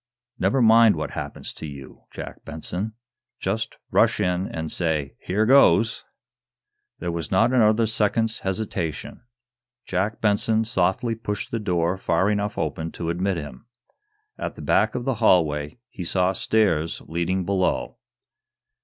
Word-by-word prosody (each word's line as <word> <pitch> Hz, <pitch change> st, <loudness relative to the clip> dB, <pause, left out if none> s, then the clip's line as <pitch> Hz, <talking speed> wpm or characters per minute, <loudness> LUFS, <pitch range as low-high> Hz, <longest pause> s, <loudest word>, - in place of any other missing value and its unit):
Never 130 Hz, -2 st, +2 dB
mind 110 Hz, -2 st, +6 dB
what 75 Hz, -, -4 dB
happens -, -, -6 dB
to 80 Hz, -, -7 dB
you, 70 Hz, -3 st, -11 dB
Jack -, -, -9 dB
Benson. 90 Hz, +8 st, -4 dB, 0.5 s
Just -, -, -2 dB
rash -, -, +3 dB
in 90 Hz, +1 st, 0 dB
and 80 Hz, -1 st, -4 dB
say 80 Hz, -5 st, -1 dB
'here 105 Hz, +4 st, 0 dB
goes'!" 110 Hz, -5 st, +5 dB, 0.9 s
There 85 Hz, -, -3 dB
was 85 Hz, -3 st, -4 dB
not 115 Hz, +7 st, +3 dB
another 110 Hz, -2 st, +4 dB
second's 110 Hz, +1 st, +1 dB
hesitation. 95 Hz, -5 st, -3 dB, 0.6 s
Jack 95 Hz, +4 st, -1 dB
Benson 110 Hz, +1 st, +2 dB
softly 110 Hz, +1 st, 0 dB
pushed 105 Hz, -2 st, -5 dB
the 115 Hz, -, -1 dB
door 90 Hz, -3 st, 0 dB
far 95 Hz, +3 st, +1 dB
enough 105 Hz, 0 st, -2 dB
open 80 Hz, 0 st, -3 dB
to 85 Hz, -1 st, -3 dB
admit 95 Hz, +2 st, -1 dB
him. 75 Hz, -, -8 dB, 0.7 s
At -, -, -4 dB
the -, -, -9 dB
back -, -, +2 dB
of 125 Hz, -, -3 dB
the 135 Hz, -, +1 dB
hallway 75 Hz, -6 st, +2 dB
he 95 Hz, -, -8 dB
saw 90 Hz, +2 st, +1 dB
stairs 95 Hz, -7 st, +1 dB
leading 85 Hz, +3 st, -1 dB
below. 95 Hz, -1 st, -1 dB
95 Hz, 140 wpm, -24 LUFS, 85-110 Hz, 0.9 s, mind